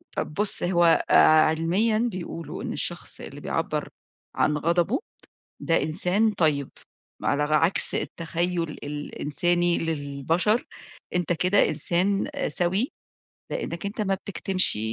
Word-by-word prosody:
طَب - - -3
بُص، 210 +4 +2
هو 175 -2 +3
آآ - - +4 0.3
علميًا 175 +8 +1
بيقولوا 170 -2 -6
إن - - -3
الشخص - - -2
اللي - - -9
بيعبَّر - - -2 0.5
عن 150 - +2
غضبه 170 - +1 0.6
ده 165 - +1
إنسان 190 +7 +1
طيب، 150 -7 +1 0.5
ما - - 0
ألغ 150 +1 0
عكس 165 +5 +3
التخيُّل 170 0 -2
الإنساني 170 +4 -1
للبشر، 165 - 0 0.5
أنت 175 0 +1
كده 180 +4 +3
إنسان 180 +6 0 0.2
سَوِي 190 +7 0 0.6
لإنّك 185 - -4
أنت 200 +2 -3
ما 195 -2 +1
بتكتمش، 190 - -1
175 Hz, 115 wpm, -25 LUFS, 160-190 Hz, 0.6 s, آآ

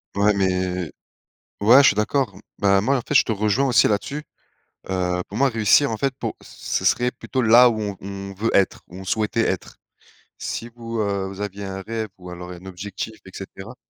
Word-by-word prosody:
Ouais, 100 +1 +4
mais 90 -3 0 0.7
ouais, 125 +7 +8
je - - +6
suis - - +3
d'accord. 105 -1 0 0.2
Bah, 100 -1 +3
moi, 135 +4 +2
en - - -2
fait, - - -4
je - - +7
te - - -1
rejoins 110 +6 +1
aussi 125 - +5
là-dessus. 140 +8 -2 0.7
Heu, 90 -1 0
pour 100 - -7
moi 135 +2 +4
réussir, 115 +5 +4
en 110 - -2
fait, 135 +4 0
pour - - -3
ce - - -4
serait 125 0 +3
plutôt 130 0 -3
là 120 +2 +7
où 110 -2 -2
on 100 -2 -3
on 100 0 -7
veut 105 +4 -1
être, 100 - +2
où 90 - -13
on 95 - -8
souhaitait 110 +4 0
être. 95 - -4 0.6
Si 115 - -4
vous, 115 -1 -5
heu, 100 -2 -1
vous 95 0 -9
aviez 100 0 -5
un 95 0 -5
rêve 110 +1 -4
ou 90 -1 -11
alors 90 0 -8
un 90 +1 -11
objectif 95 +3 -6
et - - -11
cetera 95 +4 -9
100 Hz, 205 wpm, -22 LUFS, 95-115 Hz, 0.7 s, ouais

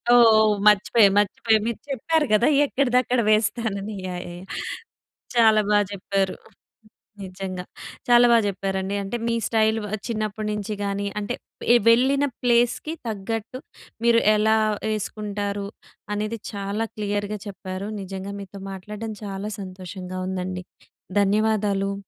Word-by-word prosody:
ఓహ్! 220 -2 +6 0.2
మర్చిపోయా, 210 +1 +6
మర్చిపోయా. 220 +2 +2
మీరు 235 - -3
చెప్పారు 300 +4 +1
గదా! 215 +3 +4 0.2
ఎక్కడిదక్కడ 255 -2 +1
వేస్తానని 215 -1 0
యాహ్! 180 -1 -4
యాహ్! 175 +2 -10 0.9
చాలా 220 -2 +6
బా 210 - +5
చెప్పారు. 195 -1 -1 0.9
నిజంగా 185 -1 -6 0.5
చాలా 240 0 +7
బా 235 - +7
చెప్పారండి. 195 0 -2
అంటే 195 +5 -3
మీ 235 - +1
స్టైల్ 220 -1 +2
ఆహ్, 215 - -2
చిన్నప్పటి 215 -2 -3
నుంచి 210 0 -3
గానీ 200 0 -2
అంటే 210 +3 -3 0.4
ఎ - - +8
వెళ్ళిన 265 +4 +4 0.2
ప్లేస్‌కి 245 +5 +2
తగ్గట్టు, 225 +3 -4 0.5
మీరు 230 -1 +5
ఎలా 220 +1 +3 0.4
ఎసుకుంటారు? 205 -1 -4 0.5
అనేది 215 +2 -3
చాలా 200 +2 -2
క్లియర్‌గా 205 0 -2
చెప్పారు. 190 0 -6
నిజంగా 195 +1 -6
మీతో 195 0 -10
మాట్లాడడం 210 +3 -6
చాలా 195 +1 -4
సంతోషంగా 185 0 -7
ఉందండి. 185 0 -3 0.6
ధన్యవాదాలు. 200 -1 +1
210 Hz, 115 wpm, -24 LUFS, 195-225 Hz, 0.9 s, ఎ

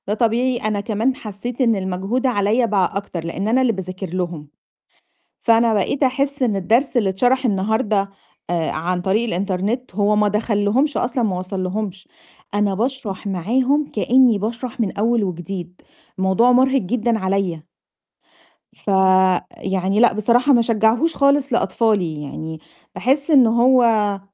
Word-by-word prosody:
ده 205 - 0
طبيعي، 240 +3 +1
أنا 215 -2 -2
كمان 225 +5 -1
حسّيت 230 +1 -6
إن 230 -3 +3
المجهود 195 +6 -2
عليّا 225 +1 +1
بقى 195 -5 +1
أكتر 185 -4 -6
لإن 190 +4 -4
أنا 245 +4 +2
اللي 255 -2 +2
باذاكر 185 0 -6
لهم، 175 -5 -4 1.0
فأنا 230 -1 +3
بقيت 215 +8 -1
أحس 275 +1 0
إن 225 -5 +1
الدرس 230 +9 +1
اللي 210 -5 +2
اتشرح 250 +7 +1
النهارده 210 0 0 0.4
آآ 170 -2 -1
عن 175 +3 -2
طريق 195 +6 0
الإنترنت 200 +3 -3
هو 210 +1 +2
ما 210 0 +3
دخلّهمش 210 +6 0
أصلًا، 245 0 -1
ما 190 -4 -1
وصلّهمش، 190 +1 -5 0.5
أنا 205 -1 +1
باشرح 225 -3 -4
معاهم 250 - 0
كإنّي 245 0 +3
باشرح 235 +4 -5
من 205 -4 -2
أول 230 +1 +1
وجديد، 180 0 -6 0.4
الموضوع 190 +6 +3
مُرهِق 260 +2 +3
جدًا 230 +3 -1
عليّا. 190 -4 -2 1.1
ف - - -26 0.7
يعني 190 +1 -1
لأ، 240 0 +5
بصراحة 240 +6 +2
ما 240 - +5
أشجّعهوش 230 +7 +1
خالص 280 -1 +2
لأطفالي، 200 -10 0
يعني 160 +2 -7 0.4
باحس 280 +5 0
إن 265 -5 +6
هو 230 -4 +3
215 Hz, 140 wpm, -20 LUFS, 190-245 Hz, 1.1 s, إن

